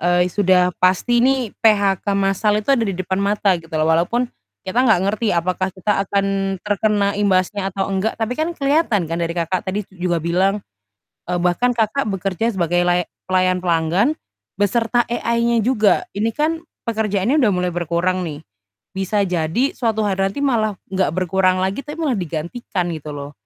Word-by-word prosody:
eee, 175 +1 +2
sudah 180 -2 +3
pasti 190 +6 +3
nih 255 -3 +1
PHK 205 -4 +3
masal 200 +2 +1
itu 245 +6 +1
ada 270 - +3
di 195 - -2
depan 185 +1 -2
mata 200 0 +2
gitu 165 0 -16
loh 155 - +2
walaupun, 180 +10 +1 0.3
kita 190 +5 -3
nggak 220 -8 +4
ngerti 215 -1 -1
apakah 185 +2 -1
kita 195 +1 0
akan 195 -1 0
terkena 205 -1 +1
imbasnya 195 0 +1
atau 195 0 -2
enggak 195 +3 -1
tapi 230 +4 -3
kan 325 +2 -1
kelihatan 275 - +1
kan 165 - -1
dari 170 0 -2
Kakak 175 +2 -2
tadi 195 +3 -1
juga 175 -3 -2
bilang, 180 +4 +2 0.8
eee, 180 - 0
bahkan 180 +8 +2
Kakak 235 +4 0
bekerja 195 +3 -1
sebagai 175 -2 +1
laya 175 0 +1 0.2
pelayan 185 -1 +2
pelanggan, 175 - +1 0.4
beserta 230 +3 +1
AI-nya 235 -1 0
juga 220 -4 +3
ini 220 +2 -1
kan, 320 +2 0 0.2
pekerjaannya 220 +3 0
udah 235 -8 +3
mulai 180 0 0
berkurang 175 +2 -1
nih, 150 -1 -7 0.5
bisa 195 +2 0
jadi 180 - 0
suatu 225 -3 0
hari 195 -1 +1
nanti 200 +9 -6
malah 220 -6 +1 0.2
nggak 190 -5 +1
berkurang 185 +1 +1
lagi, 190 +6 -1
tapi 295 - -6
malah 285 -7 0
digantikan 175 +2 -3
gitu 155 -2 -6
loh, 145 0 -7
195 Hz, 165 wpm, -20 LUFS, 180-225 Hz, 0.8 s, nggak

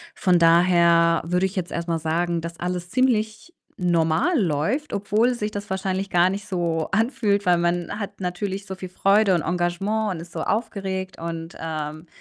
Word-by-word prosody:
Von 180 -2 +3
daher 170 0 +5
würde 180 +2 +1
ich 190 - -4
jetzt 180 -3 -3
erst 170 0 -3
mal 165 - 0
sagen, 170 +2 -1
dass 170 0 -7
alles 180 0 -3
ziemlich 245 - 0 0.3
normal 170 - +2
läuft, 180 - 0
obwohl 215 +5 +1
sich 210 -2 -3
das 205 0 -6
wahrscheinlich 190 0 -2
gar 175 +1 +4
nicht 200 +1 -5
so 170 -4 -1
anfühlt, 210 -2 +1
weil 180 -1 +4
man 175 +3 -1
hat 200 -2 -6
natürlich 190 +2 -3
so 190 - -6
viel 185 -1 -8
Freude 195 +1 +3
und 170 - 0
Engagement 180 +5 -1
und - - -7
ist 170 +1 -12
so 165 - -4
aufgeregt 190 -4 -3
und, 165 0 -6
ähm 155 0 -5
180 Hz, 175 wpm, -23 LUFS, 170-200 Hz, 0.3 s, daher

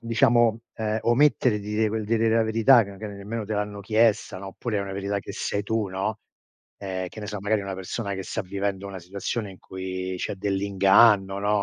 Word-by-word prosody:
diciamo, 115 -1 +3
ehm, 110 0 -1
omettere 120 -3 +3
di 105 - -8
dire 110 +1 +1
quel 110 0 -2
di 115 +2 +1
dire 115 0 +2
la 115 - +4
verità 115 +3 +5
che 100 -1 -9
che 110 - -6
nemmeno 105 +2 -5
te 110 - -5
l'hanno 105 0 -3
chiesta, 110 -1 +2
no, 95 +1 -7
oppure 105 +2 -3
è - - 0
una 100 -1 -5
verità 100 +1 -2
che - - -9
sai 100 - -2
tu, 110 0 -1
no, 95 +3 -3 0.6
ehm, 95 -2 -4
che 110 - -10
ne 105 - -6
so, 105 - -4
magari 105 +1 +1
una 100 -1 -4
persona 100 +2 -4
che 95 -1 -5
sta - - -3
vivendo 100 +1 -3
una 95 -1 -7
situazione 100 +4 -4
in 95 - -15
cui 95 0 -5
c'è - - -3
dell'inganno, 100 +1 +4
no, 105 0 +1
105 Hz, 215 wpm, -25 LUFS, 95-110 Hz, 0.6 s, verità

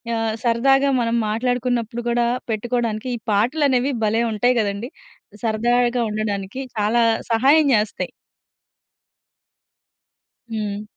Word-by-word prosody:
ఆహ్, 225 -1 -1
సరదాగా 270 +4 +3
మనం 230 0 0
మాట్లాడుకున్నప్పుడు 240 0 -1
గూడా 235 0 +1 0.2
పెట్టుకోవడానికి 230 +1 -2
ఈ - - -14
పాటలు 250 +9 +2
అనేవి 260 +1 +1
భలే 225 +2 +1
ఉంటాయి 245 +4 +2
గదండీ. 205 +4 -3 0.5
సరదాగా 240 +2 +1
ఉండడానికి 210 +2 -3 0.2
చాలా 215 +3 +2 0.3
సహాయం 280 +6 +4
జేస్తాయి. 210 0 -1 2.4
హ్మ్. 210 -2 -3
235 Hz, 100 wpm, -21 LUFS, 215-250 Hz, 2.4 s, సహాయం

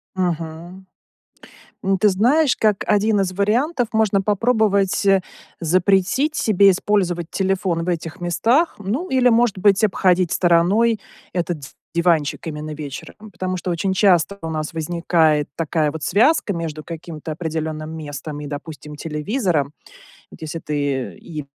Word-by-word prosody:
Мгм. 175 +1 -4 1.0
Ну, 195 0 +2
ты 210 +2 +4
знаешь, 255 +9 +3
как 210 -3 +1
1 210 0 +2
из 185 - -1
вариантов, 235 - +1
можно 215 -3 +2
попробовать, 205 -2 +1
э, 195 -1 +4 0.4
запретить 190 - +2
себе 200 -2 +4
использовать 180 -3 0
телефон 190 -3 -1
в - - -2
этих 165 -2 -4
местах, 230 - +1
ну 225 - -3
или, 255 -1 +4
может 230 -3 +2
быть, 195 +2 +3
обходить 185 -4 +2
стороной 190 +6 +3 0.3
этот 175 -3 -2 0.3
диванчик 170 -4 +1
именно 155 0 -5
вечером, 150 +8 -9
потому 185 0 -3
что 180 0 -3
очень 190 +3 -1
часто 190 -1 +3
у 165 - -4
нас 155 0 -3
возникает 160 -2 +1
такая 155 -2 0
вот 160 -2 -6
связка 230 - +3
между 160 -3 -5
каким-то 165 -1 -7
определенным 160 -1 -4
местом 150 -1 -6
и, 145 - -6
допустим, 150 0 -8
телевизором. 155 - -1 0.6
Вот - - -15
если 160 +1 -5
ты 145 -4 -2
и 155 -4 -8
180 Hz, 135 wpm, -21 LUFS, 160-205 Hz, 1.0 s, ты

